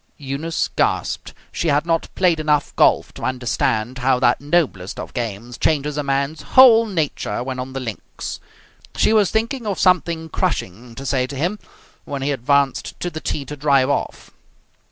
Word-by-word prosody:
Eunice 145 +4 -2
gasped. - - 0 0.2
She 170 - -2
had 145 +1 +2
not 165 -1 0
played 175 -4 +2
enough 150 -2 0
golf - - +3
to - - -11
understand 125 -1 -1
how 130 +1 +2
that 120 0 +3
noblest 145 - 0
of - - -7
games 120 0 -5
changes 150 -1 +1
a 150 - 0
man's 140 +2 -1
whole 235 -3 +7
nature 150 - -2
when 130 0 -4
on 130 +1 -5
the 135 - -3
links. 115 -5 -6 0.6
She - - +3
was 210 -4 +4
thinking 230 +2 -1
of 200 - -1
something 170 -3 +2
crushing 120 - -3
to 135 - -8
say 130 -2 0
to 140 - -7
him, 175 +9 -1 0.4
when 140 -1 -5
he 145 - 0
advanced 140 +1 0
to 175 - -3
the 160 0 -6
tee 140 - -3
to 150 - -7
drive 140 -2 +3
off. - - -3
140 Hz, 175 wpm, -20 LUFS, 130-165 Hz, 0.6 s, whole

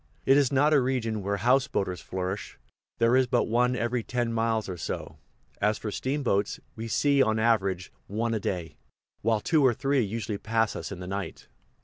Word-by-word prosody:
It 135 - +6
is 140 -3 +3
not 145 +3 +4
a 145 - +5
region 120 -4 -1
where 100 +1 -1
houseboaters 120 -7 +1
flourish 95 +2 -4 0.4
there 115 +1 +4
is 130 -1 +4
but 120 0 +2
one 125 +2 +2
every 120 0 -1
ten 120 0 -2
miles 115 -1 0
or 95 - -4
so; 85 - -5 0.4
as 105 +1 +2
for 105 - -5
steamboats, 130 -6 -1 0.2
we 115 +1 -5
see 140 +4 +3
on 110 -3 +2
an 110 - +1
average 95 - +1
one 115 +2 -1
a 110 - 0
day, 90 -4 -4 0.4
while 110 0 +2
two 155 +2 +2
or 125 -3 +4
three 140 +1 +1
usually 105 -1 -3
pass 115 0 0
us - - -5
in 95 -2 -7
the - - -6
night. 100 +1 -5
115 Hz, 195 wpm, -27 LUFS, 100-125 Hz, 0.4 s, It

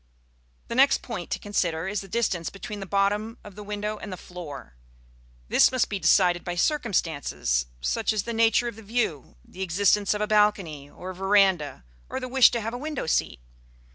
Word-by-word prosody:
The - - -5
next - - +4
point - - -6
to - - -1
consider 175 -4 -1
is 205 +1 -2
the 195 - -10
distance 190 -5 -1
between 205 +1 -7
the 195 - -6
bottom 205 +4 0
of 205 - -11
the 210 - -10
window 210 +1 -4
and 210 - -7
the 185 - -5
floor. 165 - -9 0.7
This - - +5
must 255 -2 +1
be 200 - -3
decided 180 -2 +3
by 175 - -4
circumstances, 160 - 0
such - - 0
as 215 -3 -1
the 235 - -4
nature 225 +1 +3
of 235 -2 -6
the - - -10
view, 205 - -2
the 185 - -11
existence 200 +3 +2
of 210 - -3
a - - +2
balcony 205 -9 +1
or 185 +5 -8
veranda, 190 - +2 0.3
or - - -3
the 255 - -5
wish 260 0 +6
to 235 - -2
have 225 +2 -4
a 245 - -4
window 300 0 -4
seat. 160 - 0
200 Hz, 195 wpm, -26 LUFS, 175-215 Hz, 0.7 s, wish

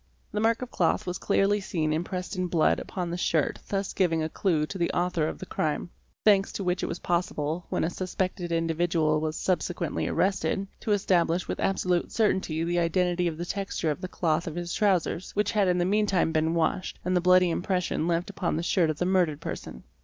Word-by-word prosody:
The - - -2
mark 225 +2 +2
of 250 - -8
cloth 170 - +1
was 180 0 -3
clearly 200 +1 +2
seen 155 -5 -1
impressed 180 +4 -3
in 185 -1 -1
blood 165 -2 +2
upon 180 -3 -4
the 175 - -2
shirt 160 -4 0
thus 195 -1 -2
giving 165 -4 +1
a 155 - -2
clue 160 -4 +1
to 190 +4 -7
the 170 - +1
author 175 -3 +1
of - - -4
the - - -7
crime; 155 +2 -2 0.3
thanks 200 -2 +5
to 200 - -3
which 180 0 0
it - - -1
was 170 - -3
possible, 170 -2 -2
when - - 0
a 160 - +1
suspected 185 -1 -3
indi 165 0 +1
vidual 160 -2 +1
was 155 0 -2
subsequently 175 -3 -1
arrested, 190 +2 0
to 215 - -3
establish 180 -3 +2
with - - -3
absolute 180 -2 0
certainty 190 -7 +1
the 175 +1 0
identity 175 +1 +1
of 160 -2 -3
the 175 - -4
texture 195 -4 -2
of 150 - -5
the 185 - -3
cloth 165 -2 0
of 160 - -4
his 175 0 -4
trousers, 190 -3 0
which 210 +1 +1
had 205 -3 +2
in 180 0 +2
the 175 - +2
meantime 200 -3 +2
been 160 +1 +1
washed, 170 +2 0
and 180 0 +1
the 180 - +3
bloody 180 0 +5
impression 180 -2 -1
left 175 +3 0
upon 185 -5 -1
the 165 - -2
shirt 170 -1 +2
of 155 - -2
the 180 - 0
murdered 180 -5 +2
person. 60 - -7
175 Hz, 215 wpm, -27 LUFS, 165-190 Hz, 0.3 s, thanks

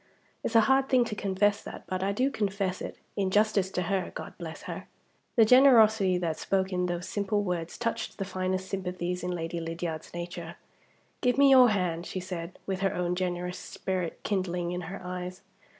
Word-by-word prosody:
It's 230 - -2
a 225 - +8
hard 265 +4 +3
thing 255 -3 +4
to 215 - -4
confess 205 +1 +1
that; - - -9
but 185 0 -3
I 195 +1 +1
do 255 +7 +1
confess 195 -5 -1
it, - - -6 0.2
in 195 -2 0
justice 205 -1 +2
to 180 -1 -2
her 190 0 -1
God - - -6
bless 160 -2 -7
her!" - - -6 0.5
The 225 - +7
generosity 220 -6 +6
that 165 -3 -2
spoke 190 0 0
in 180 0 +1
those 175 0 -3
simple 205 0 0
words 175 -3 -3
touched 230 -1 -3
the 195 - -2
finest 185 0 -2
sympathies 180 -2 -3
in 180 - -3
Lady 170 -1 -3
Lydiard's 165 -1 -4
nature. 170 -1 -6 0.7
"Give 250 0 +2
me 280 -1 +7
your 255 -2 +8
hand," 180 -4 -1
she 185 - -4
said, 180 -1 -6
with 190 -1 -2
her 195 0 0
own 180 0 0
generous 180 0 -2
spirit 185 -3 -3
kindling 180 -3 -1
in 180 0 -3
her 195 - -6
eyes. 180 0 -5
185 Hz, 190 wpm, -29 LUFS, 180-205 Hz, 0.7 s, a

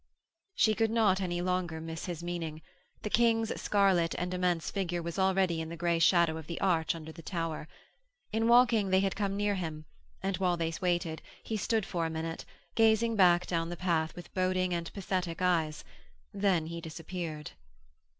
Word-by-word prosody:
She 220 - +4
could 225 +1 +1
not 210 -4 +3
any 175 -2 -1
longer 180 -3 -1
miss 160 0 -6
his 170 -2 -5
meaning. 165 -3 -4 0.4
The 210 - -2
King's 225 -1 +2
scarlet 190 -5 +2
and 180 +1 -2
immense 180 -3 0
figure 180 -3 -2
was 170 +3 -4
already 190 -3 +2
in 160 - -5
the 170 - -7
grey 170 0 +1
shadow 165 -1 +4
of 160 -1 -9
the 170 - -5
arch 170 -4 +1
under 160 -1 -8
the 165 - -11
tower. 165 -2 -4 0.7
In 225 +1 +1
walking, 235 -4 +5
they 190 0 +4
had 195 -1 0
come 200 -1 -1
near 205 0 +1
him, 160 -5 -4 0.4
and 195 -2 0
while 180 -1 +1
they 165 -1 -1
waited 175 -3 0 0.2
he 220 - -3
stood 215 0 0
for 170 -3 -1
a - - -4
minute, 160 0 -4 0.3
gazing 225 0 +3
back 180 -3 +5
down 165 -1 -1
the 175 - -5
path 165 -3 0
with 175 - -11
boding 185 -1 +1
and 170 -1 -3
pathetic 185 -3 -3
eyes; 160 -4 +1 0.5
then 195 -5 +2
he 170 +1 -6
disappeared. 160 -1 -6
175 Hz, 180 wpm, -31 LUFS, 165-195 Hz, 0.7 s, walking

